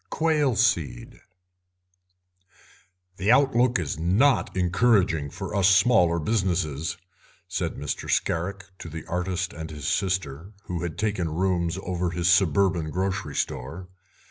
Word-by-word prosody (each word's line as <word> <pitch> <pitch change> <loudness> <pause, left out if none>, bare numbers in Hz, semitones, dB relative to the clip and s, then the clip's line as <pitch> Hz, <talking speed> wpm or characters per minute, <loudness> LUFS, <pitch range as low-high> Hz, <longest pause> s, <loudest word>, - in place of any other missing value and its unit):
QUAIL 150 -6 +1
SEED 75 - 0 2.0
"The 100 +4 +2
outlook 125 -2 +3
is 80 -4 -3
not 100 - +2
encouraging 90 -5 +2
for - - -7
us 100 -2 +4
smaller 95 -4 +4
businesses," 85 -5 -1 0.5
said 90 -3 -3
Mr. 75 0 -5
Scarrick 95 +4 -1
to 85 - -8
the 80 0 -8
artist 90 +1 -2
and 80 -1 -7
his 75 -3 -6
sister, 90 -1 -2
who 90 -4 -4
had 85 -2 -4
taken 105 -6 -1
rooms 85 +1 0
over 90 -1 -2
his 85 +1 -1
suburban 90 -2 +3
grocery 95 -3 -3
store. 80 +9 -4
90 Hz, 120 wpm, -25 LUFS, 80-100 Hz, 2.0 s, us